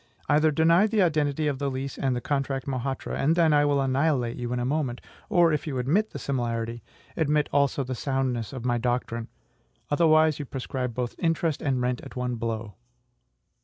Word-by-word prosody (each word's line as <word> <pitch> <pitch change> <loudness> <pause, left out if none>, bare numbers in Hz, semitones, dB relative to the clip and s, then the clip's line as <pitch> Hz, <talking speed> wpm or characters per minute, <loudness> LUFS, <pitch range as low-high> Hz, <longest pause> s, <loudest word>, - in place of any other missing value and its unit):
Either 155 +2 +4
deny 165 +6 +4
the 215 -2 +2
identity 155 -3 +1
of 140 -3 -1
the 140 -1 -1
lease 135 +1 -4
and 130 -2 0
the 120 - -3
contract 135 -2 -2
Mohatra, 135 0 -3
and 155 +4 +3
then 165 -3 +4
I 145 0 +4
will 145 -1 +2
annihilate 135 -2 +1
you 120 -1 -4
in 125 - -1
a 120 - -1
moment; 135 -3 -1 0.3
or, 170 -3 +4
if 150 - -2
you 135 -3 -2
admit 165 - +1
the - - -7
similarity, 120 -3 -2 0.3
admit 150 -2 +1
also 140 -1 +2
the 130 0 -4
soundness 130 -4 -1
of 130 -3 -7
my 120 -1 +1
doctrine: 120 -1 -2 0.6
otherwise 155 0 +4
you 145 - -4
proscribe 125 -2 -4
both 125 -1 -2
interest 165 -2 0
and 130 -3 0
rent 125 0 -1
at - - -11
one 125 -1 -2
blow"? 115 -2 -4
135 Hz, 190 wpm, -26 LUFS, 125-150 Hz, 0.6 s, Either